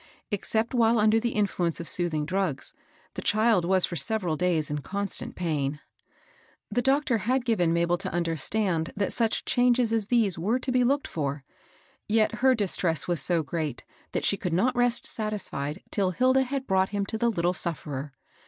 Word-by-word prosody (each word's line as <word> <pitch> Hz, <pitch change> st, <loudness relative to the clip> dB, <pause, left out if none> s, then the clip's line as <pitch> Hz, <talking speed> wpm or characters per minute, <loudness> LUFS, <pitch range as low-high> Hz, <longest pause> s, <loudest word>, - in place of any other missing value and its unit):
Except 220 Hz, +3 st, 0 dB
while 230 Hz, -1 st, +3 dB
under 215 Hz, +1 st, +4 dB
the 235 Hz, +1 st, -2 dB
influ 200 Hz, -4 st, +1 dB
ence 165 Hz, -, -3 dB
of 170 Hz, -, -6 dB
soothing 160 Hz, -4 st, -1 dB
drugs, 185 Hz, -4 st, -1 dB, 0.4 s
the -, -, -5 dB
child 215 Hz, -4 st, +2 dB
was 185 Hz, 0 st, +3 dB
for 175 Hz, -, -6 dB
several 185 Hz, -4 st, 0 dB
days 165 Hz, -3 st, 0 dB
in 150 Hz, -, -2 dB
constant 200 Hz, +7 st, -3 dB
pain. 150 Hz, -4 st, -2 dB, 0.9 s
The 245 Hz, +4 st, +1 dB
doctor 270 Hz, -2 st, +2 dB
had 250 Hz, +4 st, 0 dB
given 185 Hz, -9 st, +2 dB
Ma 170 Hz, 0 st, +2 dB
bel 175 Hz, 0 st, 0 dB
to -, -, -4 dB
understand 170 Hz, +1 st, 0 dB
that 200 Hz, -1 st, -1 dB
such 230 Hz, -2 st, 0 dB
changes 245 Hz, -2 st, +2 dB
as 220 Hz, -3 st, 0 dB
these 215 Hz, -8 st, +2 dB
were 215 Hz, +9 st, +1 dB
to 255 Hz, 0 st, -3 dB
be 250 Hz, 0 st, +3 dB
looked 280 Hz, +3 st, +1 dB
for; 140 Hz, -3 st, -3 dB, 0.6 s
yet 220 Hz, +1 st, +2 dB
her 260 Hz, 0 st, +5 dB
distress 180 Hz, -, 0 dB
was 175 Hz, -5 st, +1 dB
so 170 Hz, +1 st, +2 dB
great 150 Hz, -4 st, -4 dB, 0.3 s
that -, -, -1 dB
she 200 Hz, -, +3 dB
could 180 Hz, -4 st, -3 dB
not 245 Hz, +9 st, +2 dB
rest 245 Hz, -1 st, +2 dB
satisfied 200 Hz, -10 st, -3 dB
till 195 Hz, -3 st, +1 dB
Hilda 260 Hz, +7 st, +2 dB
had 270 Hz, +1 st, -3 dB
brought 190 Hz, -3 st, +2 dB
him 200 Hz, -1 st, -2 dB
to 220 Hz, -, -4 dB
the 235 Hz, -, +2 dB
little 175 Hz, -4 st, 0 dB
sufferer. 150 Hz, -5 st, -4 dB
195 Hz, 185 wpm, -27 LUFS, 170-230 Hz, 0.9 s, her